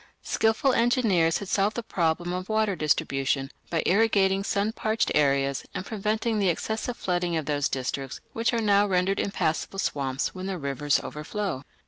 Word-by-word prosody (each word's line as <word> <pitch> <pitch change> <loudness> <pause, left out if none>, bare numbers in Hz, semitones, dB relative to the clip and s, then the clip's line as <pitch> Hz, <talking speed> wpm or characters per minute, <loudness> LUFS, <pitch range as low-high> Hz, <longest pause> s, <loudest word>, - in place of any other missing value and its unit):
Skilful 225 +4 +2
engineers 225 -10 +3
had 200 - -7
solved 200 +3 +1
the 235 - -2
problem 175 -3 0
of 185 +2 -4
water 215 -2 +1
distribution 135 -3 0 0.2
by 165 - 0
irrigating 195 -2 +3
sun 200 +1 0
parched 220 0 0
areas 140 -2 +2
and 185 - -3
preventing 220 +1 -1
the 195 -2 +3
excessive 220 +7 -2
flooding 175 -2 -1
of 155 - -2
those 145 -1 0
districts 135 0 -3
which 230 +2 +1
are 235 -2 0
now 205 -1 +4
rendered 190 +1 +1
impassable 195 -1 -1
swamps 135 -7 -1
when 185 0 -6
the 190 -1 -3
rivers 140 -1 0
overflow. 155 -1 -4
190 Hz, 160 wpm, -26 LUFS, 150-215 Hz, 0.2 s, now